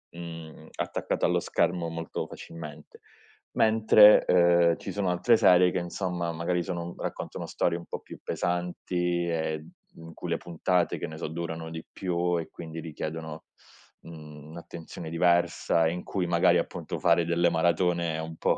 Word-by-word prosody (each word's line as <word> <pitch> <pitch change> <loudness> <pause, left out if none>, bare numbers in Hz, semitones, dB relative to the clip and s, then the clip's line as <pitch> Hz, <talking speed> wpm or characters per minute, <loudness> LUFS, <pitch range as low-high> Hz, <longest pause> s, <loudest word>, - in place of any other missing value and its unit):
uhm, 85 -2 -9
attaccato - - -3
allo - - +2
schermo 85 -1 0
molto 80 0 -4
facilmente. 75 -2 -10 0.5
Mentre, 110 -1 +6
ehm, 85 -1 +4
ci 95 - -6
sono 95 -2 0
altre 115 +6 +4
serie 90 -2 +6
che, 90 - -2
insomma, 85 -1 -2
magari, 85 +2 -1
sono 85 -2 -5
raccontano - - -5
storie 85 -1 0
un 85 - -10
po' - - -6
più - - -12
pesanti 90 0 -1
e, 80 -2 -1
uhm 80 +1 -14 0.4
in 80 - -11
cui - - -6
le - - +1
puntate, 90 +1 0
che - - -4
ne 80 0 -8
so, - - -3
durano 80 0 -5
di 80 0 -7
più 90 -1 -1
e 80 - -6
quindi 80 -1 -8
richiedono, 80 0 -6 0.6
mhmm, 75 -2 -11
un'attenzione 85 0 -9
diversa, 85 -1 +2
in 90 +2 -4
cui, 95 -3 -2
magari, 85 0 +4
appunto, - - -3
fare 85 0 +3
delle 85 0 +2
maratone 85 0 +1
è - - -3
un 80 0 -6
po' - - +1
85 Hz, 160 wpm, -27 LUFS, 80-90 Hz, 0.6 s, Mentre